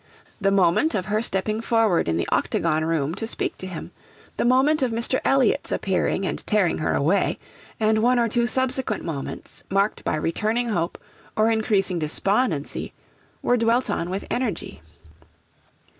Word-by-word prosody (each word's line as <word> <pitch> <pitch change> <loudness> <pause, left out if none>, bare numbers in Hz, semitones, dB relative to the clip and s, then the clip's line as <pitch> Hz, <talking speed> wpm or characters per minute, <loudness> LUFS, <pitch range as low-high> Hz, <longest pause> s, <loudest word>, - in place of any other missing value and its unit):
The 195 - +3
moment 195 - +3
of 190 -3 -1
her 210 +1 0
stepping 215 0 0
forward 225 - +2
in 80 0 0
the 85 - -1
octagon 155 -1 +1
room 160 -2 0
to 225 +5 -4
speak - - -1
to 185 - -5
him, 180 -4 -7 0.5
the - - 0
moment 265 +5 +3
of 260 - +2
Mr. 235 +3 0
Elliot's 270 -4 +2
appearing 190 0 0
and - - -3
tearing 205 -4 +2
her 155 - 0
away, 165 +8 +1 0.4
and 215 0 +2
one 245 +2 +3
or 235 -1 +3
two 235 +1 +1
subsequent 260 -3 0
moments, 150 -5 -6
marked 195 +2 0
by - - 0
returning 215 +10 -1
hope 170 -5 -1 0.4
or 220 +1 +3
increasing 200 -5 +1
despondency, 165 - 0 0.5
were 245 - +3
dwelt 230 0 +2
on 175 -3 -2
with 190 +2 -4
energy. 240 - -3
210 Hz, 160 wpm, -23 LUFS, 175-235 Hz, 0.5 s, The